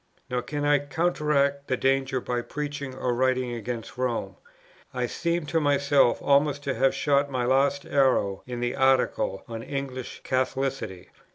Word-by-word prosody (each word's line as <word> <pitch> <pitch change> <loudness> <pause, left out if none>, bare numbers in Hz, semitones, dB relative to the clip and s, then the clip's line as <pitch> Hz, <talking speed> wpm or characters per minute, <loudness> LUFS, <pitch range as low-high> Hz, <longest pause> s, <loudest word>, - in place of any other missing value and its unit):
"Nor 125 0 0
can 145 +4 -3
I 145 0 +4
counteract 145 -2 0
the 130 - 0
danger 135 0 +1
by 120 0 -2
preaching 145 0 -5
or 125 -1 -1
writing 130 0 +1
against 120 +2 -6
Rome. 125 -2 -2 0.6
I - - 0
seem 170 -1 -1
to 165 +2 +1
myself 140 -3 +3
almost 145 0 +3
to 140 - -1
have 135 0 +2
shot 140 -1 +2
my 130 -3 -1
last 135 +2 +2
arrow 130 -8 +2
in 120 -1 -5
the 120 0 -1
Article 130 -7 +2
on 115 -1 -6
English 130 -1 -5
Catholicity. 130 -7 -2
135 Hz, 155 wpm, -26 LUFS, 125-140 Hz, 0.6 s, I